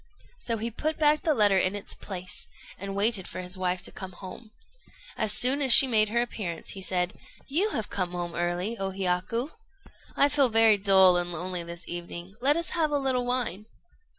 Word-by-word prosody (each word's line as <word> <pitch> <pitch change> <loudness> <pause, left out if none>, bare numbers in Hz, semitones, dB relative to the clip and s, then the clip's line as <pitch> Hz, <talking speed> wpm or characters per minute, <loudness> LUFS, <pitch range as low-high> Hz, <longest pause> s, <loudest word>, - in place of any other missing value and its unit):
So 230 - -2
he 230 +2 -4
put 310 +7 -3
back 300 -1 +3
the 310 -3 +1
letter 205 -4 +3
in 185 +2 0
its 205 - -5
place, 185 -2 -7 0.3
and 195 +1 -6
waited 200 -2 0
for - - -7
his 180 +1 -2
wife 185 -1 -2
to - - -6
come 190 -1 -9
home. 195 +5 -11 0.7
So 220 - -1
soon 255 +6 +4
as 265 -4 +7
she - - +11
made 215 -4 +2
her 235 +2 +1
appearance 185 -9 -5
he 195 - -8
said 180 -1 -1 0.3
"You 350 +10 +1
have 225 - -4
come 180 -2 -3
home 175 -1 -4
early, 175 +6 -2
O 195 0 -2
Hiyaku. 190 - -2 0.6
I 280 - +4
feel 285 -3 +2
very 225 -2 +4
dull 190 -2 +5
and 175 0 -3
lonely 180 +1 -4
this 170 +1 -9
evening; 175 +1 -7
let 285 +4 +3
us 335 - -4
have 320 -3 0
a 295 - 0
little 260 -3 -1
wine." 220 -5 -2
200 Hz, 200 wpm, -27 LUFS, 180-245 Hz, 0.7 s, she